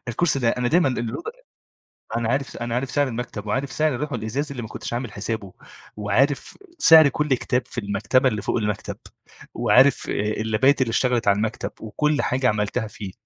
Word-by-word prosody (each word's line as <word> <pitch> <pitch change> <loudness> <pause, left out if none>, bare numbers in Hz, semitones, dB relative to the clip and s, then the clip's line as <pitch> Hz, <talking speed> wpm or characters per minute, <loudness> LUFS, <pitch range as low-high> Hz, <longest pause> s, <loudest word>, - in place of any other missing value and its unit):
الكرسي 140 +4 +1
ده، 120 -3 +1
أنا 125 0 -1
دايمًا 165 -3 +3
ال 120 -1 -3 1.0
أنا 115 -1 -1
عارف 135 +1 -2
أنا 120 0 -3
عارف 125 +1 -2
سعر 145 -2 +2
المكتب 115 -3 -5
وعارف 135 +6 -1
سعر 155 -3 +1
اللوح 145 +2 -4
الإزاز 125 +6 -3
اللي 125 -3 -5
ما 110 - -6
كنتش 120 - -7
عامل 120 -2 -3
حسابه، 105 -2 -5 0.4
وعارف 125 +8 0 0.2
سعر 160 - +8
كل 150 0 0
كتاب 125 0 0
في - - -12
المكتبة 105 +6 +1
اللي 105 -3 -3
فوق - - -1
المكتب 105 -2 -3 0.6
وعارف 135 +3 +4
اللَابات 110 +6 +1
اللي 120 - +1
اشتغلت 120 -2 +1
على 100 0 +4
المكتب 110 +2 -2
وكل 150 +7 0
حاجة 125 0 +1
عملتها 105 +1 -1
فيه، 105 -3 -8
120 Hz, 175 wpm, -23 LUFS, 110-135 Hz, 1.0 s, سعر